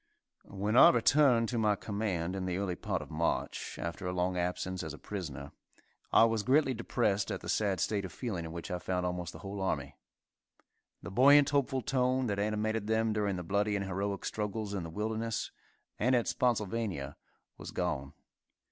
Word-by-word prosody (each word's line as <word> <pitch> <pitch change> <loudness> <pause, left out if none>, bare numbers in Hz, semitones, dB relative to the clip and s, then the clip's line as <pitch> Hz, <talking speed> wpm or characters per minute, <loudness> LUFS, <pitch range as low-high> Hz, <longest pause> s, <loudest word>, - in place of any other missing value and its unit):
When 100 +3 -2
I - - +10
returned 120 -1 +4
to 120 - -1
my 105 -2 +3
command 95 -4 -2
in 95 -1 -3
the 90 -1 -1
early 95 -2 -1
part - - -3
of - - -13
March, - - -2
after 85 +2 -4
a - - -1
long 90 0 0
absence 90 +1 -2
as 80 -3 -5
a - - -13
prisoner, 75 -9 -6 0.6
I - - +7
was 115 -1 +2
greatly 135 +3 +3
depressed 110 -3 0
at - - -3
the - - -8
sad 100 -4 +1
state 100 +2 0
of 95 - -6
feeling 95 -2 -4
in 80 - -6
which 85 +1 -6
I 90 - -2
found 90 +1 -2
almost 90 -1 -3
the - - -10
whole 100 0 -5
army. 95 - -2 1.1
The - - -6
buoyant, 140 +6 +6
hopeful 135 -2 +1
tone 130 -2 +1
that 100 -3 -1
animated 105 +1 -1
them 110 0 +1
during 105 -2 0
the 90 - -4
bloody 100 +4 0
and 100 -1 -1
heroic 100 +1 -3
struggles 105 -1 -3
in 100 - -2
the 85 - -6
Wilderness, 110 +4 -2 0.5
and 125 +4 +3
at 120 - +1
Spotsylvania, 105 - -1 0.4
was - - -7
gone. 70 +1 -2
100 Hz, 185 wpm, -31 LUFS, 90-115 Hz, 1.1 s, I